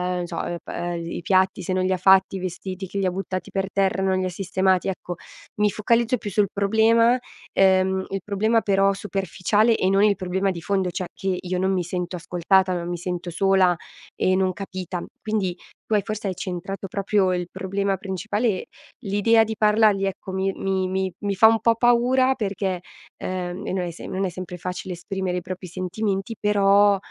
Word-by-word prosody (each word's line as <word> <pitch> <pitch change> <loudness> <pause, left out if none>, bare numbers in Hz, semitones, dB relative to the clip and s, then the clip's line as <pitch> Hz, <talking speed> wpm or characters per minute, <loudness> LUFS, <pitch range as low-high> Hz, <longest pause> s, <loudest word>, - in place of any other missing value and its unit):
non 180 -1 -2
so, - - -6
uhm, 175 - -3
pa - - -8 0.2
uhm, 170 - -4
gl 165 - -6
i - - -4
piatti 185 +1 +2
se 185 - -2
non 185 0 +1
li 185 - +1
ha 185 - +2
fatti, 190 +1 +4
i - - -5
vestiti 185 +1 -5
che 200 - -6
li 195 - +1
ha 185 - +1
buttati 185 0 -4
per 195 0 -1
terra, 195 -1 +1
non 190 0 +2
ha - - -1
li 185 - -1
sistemati 185 0 +1
ecco, 180 -2 -4 0.4
mi 210 0 +4
focalizzo 230 +4 +1
più 210 - -6
sul 205 +1 +2
problema, 225 +4 +4 0.3
ehm, 190 0 +3
il 195 0 -3
problema 215 +3 +1
però 195 0 +3
superficiale 195 +3 +1
e 185 - +1
non 195 +1 +4
il 210 -1 +4
problema 190 +1 -1
di 170 -2 -6
fondo 190 -1 0
cioè, 180 +1 -3
che 190 -1 -2
io 180 0 -2
non 190 +1 +1
mi 185 -2 0
sento 180 +1 -4
ascoltata 180 +2 +2
ma 175 -1 -3
mi 175 0 -3
sento 175 0 -4
sola 190 0 +3 0.4
e 185 - +2
non 185 -1 +1
capita. 185 -2 -5 0.2
Quindi 200 -5 -1 0.3
tu - - -3
hai 210 - +4
forse, 215 0 -4
hai 190 - -2
centrato 190 +2 -5
proprio 195 0 +1
il 180 -1 -2
problema 195 +1 -1
principale 200 +2 -2 0.3
l'idea 225 +1 +3
di 220 0 -4
parlargli 210 -2 +4
ecco, 195 0 -4
mi 190 +1 -1
mi 190 -1 -1
mi 190 0 -1
mi 200 -1 -2
fa 220 +4 +7
un 225 0 +4
po' 230 +1 +3
paura 245 +2 +3
perché, 195 -4 -2 0.4
ehm 185 +1 -4
e - - -2
non 185 -1 -1
è 175 - -4
se 170 - -10
non 190 +1 -2
è - - -1
sempre 180 0 -7
facile 180 +1 -5
esprimere 180 +1 -3
i - - -2
propri 185 +1 -7
sentimenti 195 +4 -3
però, 205 -1 +4
190 Hz, 205 wpm, -23 LUFS, 185-205 Hz, 0.4 s, fa